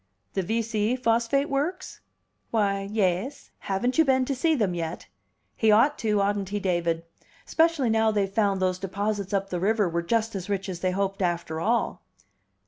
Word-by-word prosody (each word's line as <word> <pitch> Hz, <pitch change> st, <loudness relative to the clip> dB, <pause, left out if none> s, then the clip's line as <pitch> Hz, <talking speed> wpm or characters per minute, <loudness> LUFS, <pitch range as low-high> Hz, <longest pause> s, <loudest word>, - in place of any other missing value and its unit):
"The 195 Hz, -, 0 dB
V 225 Hz, +5 st, -1 dB
C 220 Hz, +1 st, 0 dB
phosphate 240 Hz, +3 st, +1 dB
works?" 310 Hz, +7 st, -3 dB, 0.5 s
"Why, 200 Hz, -3 st, 0 dB
yais. 205 Hz, +4 st, -1 dB
Haven't 245 Hz, +8 st, -1 dB
you -, -, +8 dB
been 260 Hz, -3 st, +2 dB
to 275 Hz, -, -1 dB
see 315 Hz, +5 st, +2 dB
them 210 Hz, -9 st, 0 dB
yet? 165 Hz, -1 st, -4 dB, 0.5 s
He 220 Hz, -1 st, +3 dB
ought 240 Hz, +8 st, +4 dB
to, 210 Hz, -2 st, +1 dB
oughtn't 200 Hz, -1 st, 0 dB
he, 205 Hz, +1 st, -2 dB
David? 170 Hz, -3 st, 0 dB, 0.4 s
'Specially 320 Hz, -7 st, +2 dB
now 220 Hz, 0 st, +3 dB
they've 205 Hz, -2 st, +1 dB
found 200 Hz, -1 st, +1 dB
those 185 Hz, -1 st, 0 dB
deposits 200 Hz, +1 st, -2 dB
up 195 Hz, -1 st, -1 dB
the 180 Hz, -, -1 dB
river 210 Hz, +2 st, +2 dB
were 170 Hz, 0 st, -1 dB
just 225 Hz, +5 st, 0 dB
as 195 Hz, -1 st, -5 dB
rich 195 Hz, -1 st, -2 dB
as 180 Hz, -2 st, -5 dB
they 185 Hz, -, 0 dB
hoped, 195 Hz, +1 st, -2 dB
after 170 Hz, -3 st, -1 dB
all." 230 Hz, +4 st, 0 dB
205 Hz, 180 wpm, -26 LUFS, 190-230 Hz, 0.5 s, you